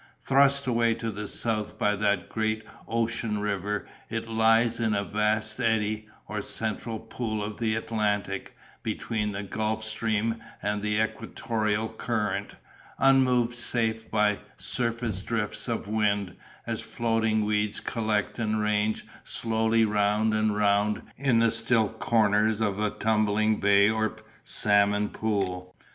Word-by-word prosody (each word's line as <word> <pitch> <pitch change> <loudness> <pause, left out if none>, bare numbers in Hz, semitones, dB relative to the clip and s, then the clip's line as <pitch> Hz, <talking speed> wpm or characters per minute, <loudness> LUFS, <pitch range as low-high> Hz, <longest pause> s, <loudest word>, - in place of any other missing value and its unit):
Thrust 140 +1 +3
away 115 -2 +2
to 115 0 -3
the 105 0 -5
south 110 -1 -1
by 105 0 +2
that 100 -3 0
great 110 0 -1 0.2
ocean 115 -1 -1
river, 105 0 -2 0.2
it 115 0 -3
lies 115 +1 +3
in 110 -2 +1
a 100 - 0
vast 105 +2 0
eddy, 110 -2 0 0.2
or 105 -1 -3
central 110 +2 -1
pool 110 -1 -4
of 105 0 -6
the 110 -2 +1
Atlantic, 105 -3 -2 0.2
between 105 -2 -2
the 100 0 -4
Gulf 110 +2 -2
Stream 110 +1 0 0.2
and 105 0 -2
the 105 0 0
equatorial 110 -1 -1
current, 105 -3 -2 0.4
unmoved 125 -3 +4
save 115 -2 0
by 105 -1 +2 0.2
surface 115 -4 -1
drifts 105 +3 -3
of 115 -4 -2
wind, 105 -3 0 0.3
as - - -3
floating 110 -2 0
weeds 105 0 0
collect 110 -1 -1
and 110 -1 0
range 105 0 0 0.2
slowly 115 0 +1
round 105 +1 +2
and 110 -1 +1
round 105 0 +2
in 130 -3 +2
the 115 0 +4
still 115 -1 +2
corners 110 -1 +2
of 105 -3 0
a 105 0 +1
tumbling 110 0 +1
bay 100 0 +5
or 110 0 0 0.3
salmon 105 0 +3
pool. 90 -4 -2
110 Hz, 135 wpm, -27 LUFS, 105-115 Hz, 0.4 s, bay